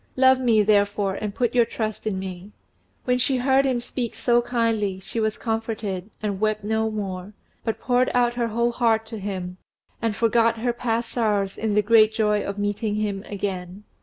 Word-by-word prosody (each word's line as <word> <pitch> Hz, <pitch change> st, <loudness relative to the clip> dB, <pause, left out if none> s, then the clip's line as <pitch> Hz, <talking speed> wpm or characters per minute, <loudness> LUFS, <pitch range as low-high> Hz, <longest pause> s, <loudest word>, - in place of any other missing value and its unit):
Love 260 Hz, 0 st, +5 dB
me, 230 Hz, -4 st, +4 dB
therefore, 205 Hz, -1 st, +2 dB
and 205 Hz, +1 st, -4 dB
put 240 Hz, -2 st, 0 dB
your 245 Hz, -1 st, +5 dB
trust 220 Hz, -2 st, -4 dB
in 200 Hz, -3 st, -1 dB
me." 190 Hz, +1 st, -7 dB, 0.5 s
When 250 Hz, 0 st, +2 dB
she 260 Hz, +1 st, +1 dB
heard 265 Hz, +2 st, +3 dB
him 255 Hz, -2 st, +1 dB
speak 240 Hz, 0 st, -4 dB
so 240 Hz, -1 st, +3 dB
kindly 225 Hz, -5 st, 0 dB
she 195 Hz, +4 st, -5 dB
was 220 Hz, -1 st, 0 dB
comforted, 220 Hz, -4 st, -3 dB
and 200 Hz, -2 st, -2 dB
wept 215 Hz, 0 st, 0 dB
no 220 Hz, +1 st, 0 dB
more, 195 Hz, -2 st, -5 dB, 0.3 s
but 225 Hz, -, -2 dB
poured 250 Hz, 0 st, +2 dB
out 240 Hz, -1 st, +3 dB
her 240 Hz, -1 st, -1 dB
whole 235 Hz, +2 st, +1 dB
heart 225 Hz, -2 st, +1 dB
to 220 Hz, -1 st, -7 dB
him, 185 Hz, -2 st, -5 dB, 0.4 s
and 225 Hz, -2 st, 0 dB
forgot 230 Hz, +1 st, +3 dB
her 240 Hz, +2 st, 0 dB
past 235 Hz, -1 st, -2 dB
sorrows 205 Hz, -4 st, 0 dB
in 220 Hz, -2 st, -1 dB
the 210 Hz, -, +4 dB
great 220 Hz, 0 st, +5 dB
joy 210 Hz, -2 st, +2 dB
of 200 Hz, 0 st, -4 dB
meeting 205 Hz, +1 st, -1 dB
him 205 Hz, -2 st, -2 dB
again. 195 Hz, -1 st, -4 dB
220 Hz, 190 wpm, -24 LUFS, 205-235 Hz, 0.5 s, Love